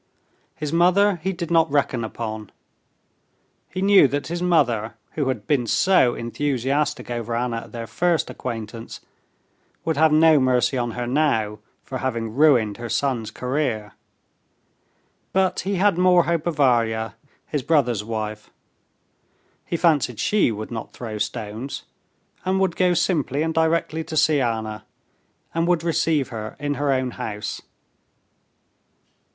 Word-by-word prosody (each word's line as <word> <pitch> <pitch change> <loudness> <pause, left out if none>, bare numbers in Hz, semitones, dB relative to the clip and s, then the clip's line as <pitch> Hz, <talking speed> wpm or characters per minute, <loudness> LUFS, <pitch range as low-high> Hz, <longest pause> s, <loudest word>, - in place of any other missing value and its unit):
His 150 0 -4
mother 180 +3 +4
he 180 +4 -2
did 170 -2 -5
not 165 -1 +4
reckon 140 -4 0
upon. 110 -2 -5 1.2
He 185 +1 -3
knew 195 -6 +7
that 145 +3 -3
his 170 +1 -3
mother, 120 -11 +1 0.2
who 145 -4 -2
had 120 -6 -2
been 130 -6 +1
so 180 - +3
enthusiastic 140 +3 -1
over 120 -1 -3
Anna 120 0 -1
at 115 - -8
their 115 -1 -5
first 170 +7 0
acquaintance, 115 -1 -6 0.8
would 160 -3 0
have 160 0 +5
no 155 0 +6
mercy 130 0 +2
on 120 -2 -1
her 120 - -2
now 120 -6 +1 0.2
for 130 - -5
having 115 -4 -2
ruined 125 -7 +4
her 120 -1 -6
son's 115 -1 -1
career. 125 -6 -2 1.4
But 190 -1 +2
he 195 +2 -1
had 190 -1 +2
more 180 -1 +5
hope 170 0 -1
of 170 - -1
Varya, 115 -6 +2 0.3
his 145 - -2
brother's 125 -8 +1
wife. 110 -1 -5 1.2
He 170 - -1
fancied 145 - +2
she 210 - +2
would 110 +1 -6
not 110 -2 -6
throw 110 -3 -6
stones, 110 +4 -4 0.6
and 190 +1 +1
would 190 -3 +1
go 180 -1 +2
simply 150 -5 +1
and 160 0 -1
directly 160 0 +1
to 160 -1 -4
see 150 -2 +4
Anna, 110 -3 -2 0.7
and 165 +1 0
would 175 -2 +2
receive 160 -4 +1
her 110 -2 -6
in 145 -1 -1
her 145 0 0
own 130 -1 0
house. 105 -2 -5
135 Hz, 145 wpm, -23 LUFS, 115-165 Hz, 1.4 s, knew